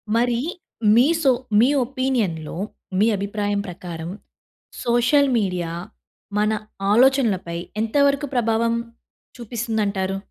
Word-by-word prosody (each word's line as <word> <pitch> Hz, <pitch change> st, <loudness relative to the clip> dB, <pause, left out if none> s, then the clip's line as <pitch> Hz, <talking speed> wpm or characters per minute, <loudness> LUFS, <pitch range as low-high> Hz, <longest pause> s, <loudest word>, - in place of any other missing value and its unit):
మరి, 240 Hz, 0 st, +2 dB, 0.6 s
మీ 245 Hz, +3 st, +6 dB, 0.2 s
సో 265 Hz, -, +6 dB, 0.3 s
మీ 240 Hz, -, +6 dB, 0.2 s
ఒపీనియన్‌లో 235 Hz, -, -2 dB, 0.4 s
మీ 215 Hz, -, +4 dB
అభిప్రాయం 205 Hz, 0 st, -2 dB
ప్రకారం, 170 Hz, -2 st, -7 dB, 0.7 s
సోషల్ 245 Hz, +4 st, +3 dB
మీడియా 180 Hz, -5 st, -1 dB, 0.7 s
మన 210 Hz, +1 st, +2 dB, 0.4 s
ఆలోచనలపై 225 Hz, -9 st, +3 dB, 0.2 s
ఎంత 225 Hz, +4 st, -3 dB
వరకు 280 Hz, +1 st, 0 dB
ప్రభావం 230 Hz, -1 st, +1 dB, 0.6 s
చూపిస్తుందంటారు? 215 Hz, -5 st, -2 dB
225 Hz, 95 wpm, -22 LUFS, 195-245 Hz, 0.7 s, మీ